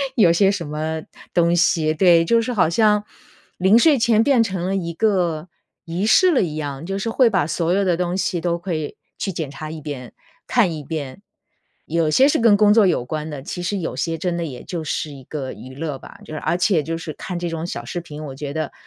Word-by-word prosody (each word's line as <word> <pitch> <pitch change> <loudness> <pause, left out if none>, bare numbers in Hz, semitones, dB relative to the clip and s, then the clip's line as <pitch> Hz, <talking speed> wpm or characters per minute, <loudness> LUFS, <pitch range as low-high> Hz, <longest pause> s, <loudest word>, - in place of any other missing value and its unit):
有 190 -8 +5
些 195 +3 +4
什 185 -5 -3
么 155 +1 -3 0.3
东 170 0 +3
西。 165 -2 +2
对， 170 0 +5
就 230 +6 +3
是 245 +2 -3
好 180 -7 +3
像 210 +3 +3 0.5
临 190 +5 +5
睡 285 +2 +5
前 225 -1 +4
变 270 -3 +4
成 190 -5 -1
了 190 - -1
一 170 -3 -3
个 180 -5 0 0.4
仪 175 +4 -2
式 365 - +5
了 275 - +3
一 160 -5 -2
样， 145 -1 -5
就 195 +2 -3
是 215 +3 -2
会 240 +1 +4
把 190 -8 +1
所 165 +2 0
有 200 +1 +2
的 175 -3 +2
东 180 0 -1
西 180 -2 -1
都 170 0 0
可 175 +1 -4
以 155 -2 -4 0.2
去 195 - -2
检 160 -4 -4
查 155 +2 -7
一 155 0 -7
遍， 130 -6 -7 0.3
看 210 -9 +2
一 155 - -6
遍。 145 +1 -6 0.7
有 165 -2 +1
些 260 - +5
是 - - +2
跟 225 -3 +5
工 210 0 +5
作 215 -2 +5
有 165 -9 +1
关 155 +4 -4
的， 145 -3 -7
其 175 - -6
实 190 +4 -1
有 165 - -4
些 165 +5 -1
真 170 +1 -2
的 170 - -2
也 130 -6 -7
就 170 -3 -4
是 150 +1 -3
一 135 -2 -11
个 135 -3 -5
娱 130 +1 -11
乐 145 -1 -4
吧， - - -14
就 - - -10
是 155 - -4
而 175 - 0
且 180 -3 +2
就 165 +3 -3
是 165 -1 -6
看 180 +3 -6
这 175 -1 -3
种 165 0 -4
小 120 -9 -5
视 175 - -4
频， 155 -2 -9
我 135 -3 -7
觉 140 +1 -6
得 155 -3 -3
170 Hz, 260 characters per minute, -21 LUFS, 155-195 Hz, 0.7 s, 有